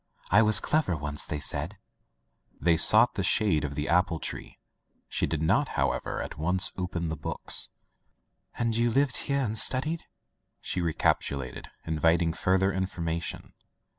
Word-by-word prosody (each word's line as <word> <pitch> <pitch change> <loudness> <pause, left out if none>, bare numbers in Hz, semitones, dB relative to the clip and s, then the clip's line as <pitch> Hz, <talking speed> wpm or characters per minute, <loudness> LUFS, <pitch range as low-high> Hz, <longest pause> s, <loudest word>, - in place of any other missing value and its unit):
I 105 +5 +6
was 110 -1 +4
clever 150 - 0
once,. 75 0 -3
they 75 - -3
said/* - - -1 0.8
They 85 -1 +3
sought - - +5
the - - -2
shade 90 -9 +2
of 70 -1 -4
the 75 +1 -3
apple 90 -2 +2
tree. - - -7 0.5
She - - -1
did 80 -1 -2
not, 80 - +2
however, - - -1
at - - -9
once 90 +4 +2
open 90 -3 -3
the 80 - -3
books. 75 - -5 0.9
"And 115 -1 0
you 120 +1 +2
live 135 +2 +1
here 140 -1 -1
and 110 -3 +1
study," 155 +6 +2 0.6
she 90 - -2
re 80 -2 -1
capitulated, 65 -3 -1 0.2
inviting 80 +1 +1
further 95 +3 +1
information. 85 -3 -4
90 Hz, 150 wpm, -27 LUFS, 80-110 Hz, 0.9 s, I